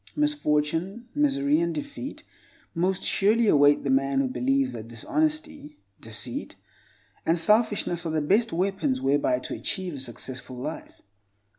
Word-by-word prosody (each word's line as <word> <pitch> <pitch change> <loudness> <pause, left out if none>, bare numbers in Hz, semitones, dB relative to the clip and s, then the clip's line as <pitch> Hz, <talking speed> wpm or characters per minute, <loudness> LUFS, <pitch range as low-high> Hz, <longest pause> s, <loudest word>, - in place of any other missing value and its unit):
Misfortune, 195 - 0
misery 155 - +2
and 170 -1 -1
defeat 150 - -6 0.5
most 185 +3 0
surely 220 +3 +3
await 145 -4 +5
the 140 - 0
man 135 0 +2
who 135 - +2
believes 130 +1 0
that 115 -1 -7
dishonesty, 300 - -2 0.2
deceit - - -6 0.7
and 165 +2 +2
selfishness 210 -2 +2
are 165 - -3
the 155 - +1
best 205 +10 +2
weapons 195 - 0
whereby 140 - +2
to 125 - -6
achieve 185 -3 -3
a 140 - -6
successful 130 0 -5
life. 135 +6 -7
165 Hz, 135 wpm, -26 LUFS, 135-220 Hz, 0.7 s, await